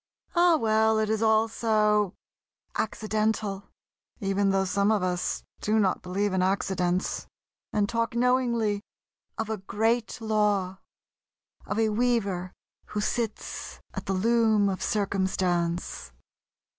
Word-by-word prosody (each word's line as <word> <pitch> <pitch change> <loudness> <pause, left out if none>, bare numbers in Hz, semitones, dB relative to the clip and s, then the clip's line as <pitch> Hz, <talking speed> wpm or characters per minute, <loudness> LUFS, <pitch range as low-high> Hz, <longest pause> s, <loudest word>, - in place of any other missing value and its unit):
Oh, 345 -2 +5
well, 220 -3 +3
it 215 0 +1
is 220 0 0
all 220 0 +4
so 210 -3 +1 0.6
"accidental"... 215 -2 -1 0.5
even 195 -1 +1
though 195 0 +2
some 200 +2 +2
of 210 -4 +1
us 180 -1 -1 0.2
do 215 +1 +1
not 195 -4 +2
believe 195 +2 -1
in 190 - +2
accidents, 185 -1 0 0.4
and 205 -1 +1
talk 230 0 -1
knowingly 235 -4 +2 0.6
of 225 - -2
a 220 0 -2
Great 225 +5 0
Law... 210 -4 0 0.9
of - - -2
a 225 -1 +3
Weaver 210 -6 0 0.4
who 210 - -3
sits 220 +1 -3
at - - -6
the 195 - +1
Loom 220 0 +3
of 190 - -3
Circumstance.... 180 - -1
210 Hz, 120 wpm, -27 LUFS, 195-220 Hz, 0.9 s, Oh